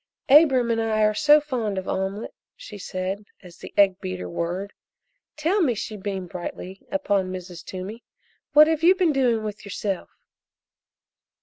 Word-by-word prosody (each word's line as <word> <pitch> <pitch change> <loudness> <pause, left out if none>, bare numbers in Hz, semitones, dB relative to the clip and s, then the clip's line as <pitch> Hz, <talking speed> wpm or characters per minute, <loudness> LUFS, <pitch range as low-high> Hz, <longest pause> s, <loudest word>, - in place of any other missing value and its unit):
"Abram 265 -5 +6
and 225 0 +1
I 220 -1 +1
are 215 0 +3
so 295 +6 +6
fond 245 -9 -3
of 190 - -4
omelette," 195 +3 -3 0.2
she 210 -2 -10
said, 185 +2 -4 0.2
as 175 -2 -13
the - - -10
egg 195 -2 +4
beater 90 -1 -5
whirred. 175 - -4 0.6
"Tell 340 +7 +1
me," 260 -9 +2
she 215 +1 -5
beamed 190 -3 -5
brightly 180 +2 -7
upon 200 -10 0
Mrs. 180 -2 -8
Toomey, 195 +5 -7 0.5
"what 300 +1 +9
have 315 -1 0
you 355 +3 +6
been 360 -5 +2
doing 245 -5 +2
with 210 -1 -6
yourself?" 200 -1 -4
210 Hz, 160 wpm, -24 LUFS, 190-265 Hz, 0.6 s, what